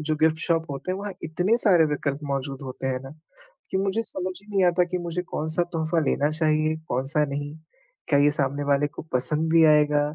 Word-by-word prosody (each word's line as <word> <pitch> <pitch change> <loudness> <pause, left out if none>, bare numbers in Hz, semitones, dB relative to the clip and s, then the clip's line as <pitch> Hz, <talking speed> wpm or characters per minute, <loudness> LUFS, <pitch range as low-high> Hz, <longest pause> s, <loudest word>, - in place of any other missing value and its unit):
जो 155 0 -1
gift 160 +1 +2
shop 165 -1 +1
होते 140 +6 -4
हैं 190 - -4
वहाँ 205 -1 -5
इतने 180 +8 +1
सारे 175 -5 +6
विकल्प 140 -1 -2
मौजूद 135 0 -4
होते 130 0 -6
हैं 130 -1 -1
ना 135 - -8 0.6
कि - - +1
मुझे 195 +3 0
समझ 185 -3 -4
ही 205 - -22
नहीं 195 -2 +2
आता 180 0 +3
कि - - +2
मुझे 175 0 -3
कौन-सा 160 0 -2
तोहफ़ा 160 0 0
लेना 145 +1 +1
चाहिए? 155 0 +1
कौन-सा 135 +5 0
नहीं? 145 +1 -5 0.5
क्या 140 -2 +3
ये 145 +1 +4
सामने 140 0 -1
वाले 140 +1 +3
को - - -9
पसंद 150 +5 +1
भी 165 - +6
आएगा? 150 -1 +4
155 Hz, 205 wpm, -25 LUFS, 145-170 Hz, 0.6 s, सारे